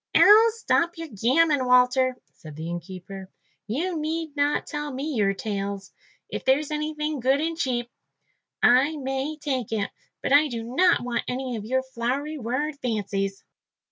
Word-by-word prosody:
"Oh, 445 +2 +8
stop 345 -6 +1
your 330 -1 -6
gammon, 265 +6 +2
Walter," 250 +1 +4 0.2
said 155 -2 -12
the 160 +2 -6
innkeeper. 185 +2 -8 0.4
"You 325 - -2
need 315 0 -3
not 290 0 +1
tell 295 -1 -4
me 280 +4 -4
your 200 -4 +1
tales. 200 -1 -4 0.3
If - - -5
there's 285 +3 +2
anything 300 -1 -2
good 265 +3 +2
and 325 +2 -1
cheap, 250 -6 -1 0.8
I 275 +6 +5
may 270 +2 -3
take 265 -7 -3
it, 210 -2 -1 0.3
but - - +1
I 295 +2 +6
do 235 -4 -5
not 315 +10 +3
want 245 -1 -2
any 255 -1 -3
of 210 -2 -6
your 260 +3 0
flowery 265 +4 -3
word 280 +5 -2
fancies." 200 -4 -2
260 Hz, 155 wpm, -25 LUFS, 225-300 Hz, 0.8 s, Oh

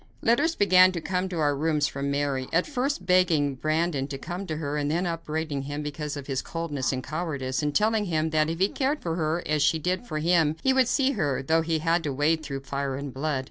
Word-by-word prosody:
Letters 290 +9 +3
began 185 -2 +6
to 170 - -2
come 185 +2 -2
to 180 - -4
our 145 -2 +2
rooms 150 0 +1
from 140 -1 -3
Mary, 140 -2 -1
at 165 +2 +2
first 275 -7 -2
begging 170 -6 +3
Brandon 155 0 -1
to 140 -1 -5
come 180 +7 -6
to 155 - -3
her, 145 -2 -3
and 145 -1 -1
then 170 +4 0
upbraiding 160 -3 -3
him 145 +2 -5
because 150 0 -4
of 140 - -7
his 135 -2 -2
coldness 150 -4 -2
and 130 -1 -3
cowardice, 140 -4 -3
and 150 -1 -2
telling 215 0 +2
him 160 -3 0
that 155 0 +2
if 165 - -2
he 190 +3 +3
cared 285 +2 -1
for 165 - -1
her 160 +1 -1
as 155 -1 0
she 160 - +3
did 185 +8 -2
for 155 - -3
him, 160 -1 +2
he 265 - +4
would 260 -2 +3
see 270 +2 +2
her, 145 - -1
though 160 +4 +2
he 165 0 0
had 165 +2 +1
to 145 - -1
wade 155 +4 +1
through 140 -3 -5
fire 140 0 -3
and 140 -1 -6
blood. 145 0 -1
155 Hz, 240 wpm, -26 LUFS, 145-180 Hz, -, began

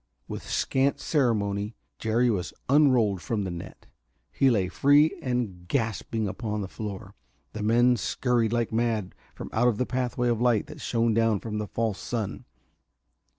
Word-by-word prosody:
With - - -5
scant 135 +1 +1
ceremony 105 -7 0 0.2
Jerry 115 +2 +2
was 95 -4 -3
unrolled 125 - +4
from 110 -3 -2
the 95 - -3
net; 85 -1 -9 0.5
he 135 - +3
lay 100 -7 +2
free 145 - +4
and 115 -9 -3
gasping 110 -1 -1
upon 105 +1 -3
the 95 - -4
floor. 100 0 -7 0.4
The 110 - -5
men 120 +3 +4
scurried 120 0 0
like 120 -1 0
mad 110 -4 0 0.2
from - - -8
out 120 -1 +2
the 125 - 0
pathway 125 -1 -1
of 115 -1 0
light 120 -4 +3
that 150 -1 -11
shone 115 -2 +1
down 115 -2 +2
from 105 0 -4
the 105 - -3
false 110 -3 -2
sun. 115 -4 -4
115 Hz, 155 wpm, -27 LUFS, 105-125 Hz, 0.5 s, unrolled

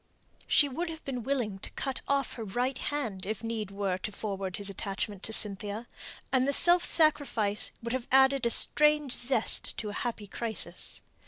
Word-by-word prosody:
She 290 - +5
would 330 +6 -3
have 320 -1 -8
been 255 -3 -3
willing 230 -6 -1
to - - -5
cut 270 -2 -3
off 280 -1 +1
her 230 - -6
right 245 +6 -1
hand, 230 -11 -3
if 215 +1 -3
need 225 -3 -3
were, 195 -2 -2
to 210 - -4
forward 195 -3 -4
his 205 - -1
attachment 195 0 -3
to 220 - 0
Cynthia; 210 +1 -2 0.4
and 260 0 +3
the 280 - +2
self 350 +4 +6
sacrifice 240 -10 +2
would 235 +1 -3
have 260 -2 -3
added 265 -1 +5
a - - +2
strange 300 +2 +3
zest 240 -2 +2
to 215 - -3
a - - -6
happy 230 -3 -3
crisis. 220 +2 -3
235 Hz, 180 wpm, -30 LUFS, 205-275 Hz, 0.4 s, self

